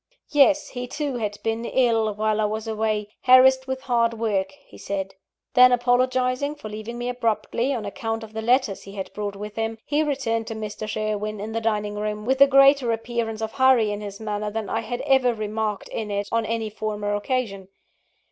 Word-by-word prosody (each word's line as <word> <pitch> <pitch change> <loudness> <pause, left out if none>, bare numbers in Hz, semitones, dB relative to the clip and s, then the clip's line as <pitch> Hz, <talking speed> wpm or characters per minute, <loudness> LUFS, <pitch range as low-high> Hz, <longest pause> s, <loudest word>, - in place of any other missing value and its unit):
Yes, 295 +1 +4
he 250 -1 -5
too 285 -1 -3
had 210 -3 -3
been 225 +1 -1
ill 230 -3 +2
while 215 0 0
I - - +2
was 215 +1 -3
away 215 -1 -1
harassed 260 +1 +6
with 260 0 -3
hard 235 -2 +1
work, 205 -4 0 0.2
he - - -17
said. 195 -1 -4 0.4
Then 250 0 +7
apologising 255 +3 +1
for 220 -7 -9
leaving 215 +3 -6
me 240 0 -3
abruptly, 245 +1 -1
on 235 -6 -2
account 225 +2 -4
of 220 0 -11
the 220 - -3
letters 240 -3 +1
he 195 - -11
had 195 -2 -6
brought 205 -1 -4
with 210 +1 -8
him, 225 0 -2
he 295 +2 +1
returned 260 -7 -1
to 225 - -5
Mr. 215 0 -5
Sherwin, 215 0 -2
in 215 +2 -5
the 230 +1 -2
dining 210 -2 -1
room, 210 0 -3
with 265 +2 +1
a 275 - +10
greater 275 -2 +5
appearance 225 -1 -3
of 220 - -3
hurry 260 -5 +4
in 205 0 -4
his 200 -1 -7
manner 210 -1 -3
than 215 -1 -4
I 225 - 0
had 240 +2 -4
ever 265 -4 +3
remarked 215 -1 -3
in 215 -2 -4
it 200 0 -2
on 230 -1 0
any 225 -1 -2
former 210 -1 -3
occasion. 205 -3 -2
225 Hz, 200 wpm, -24 LUFS, 210-250 Hz, 0.4 s, a